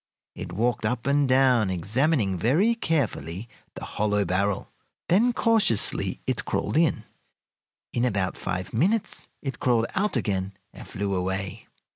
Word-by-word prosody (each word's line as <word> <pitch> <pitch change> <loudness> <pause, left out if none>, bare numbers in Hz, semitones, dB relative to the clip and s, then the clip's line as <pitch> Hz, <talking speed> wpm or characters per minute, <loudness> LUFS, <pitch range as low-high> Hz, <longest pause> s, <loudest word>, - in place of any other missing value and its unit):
It - - -7
walked 115 +5 0
up 115 +2 -1
and 140 0 +2
down, 130 -5 +4
examining 105 - +1
very 160 - +3
carefully 115 - -2 0.3
the - - -7
hollow 105 -1 0
barrel, 95 +2 -1 0.4
then 215 +8 +4
cautiously 225 - +1
it - - -1
crawled - - -2
in. - - +2 0.9
In 120 - 0
about 100 -6 0
five 95 -1 -4
minutes 200 - 0 0.2
it 135 -4 -4
crawled 120 -3 +2
out 200 -6 +1
again 100 -4 -2 0.2
and - - -11
flew 100 0 -3
away. 95 0 -3
115 Hz, 135 wpm, -26 LUFS, 95-145 Hz, 0.9 s, down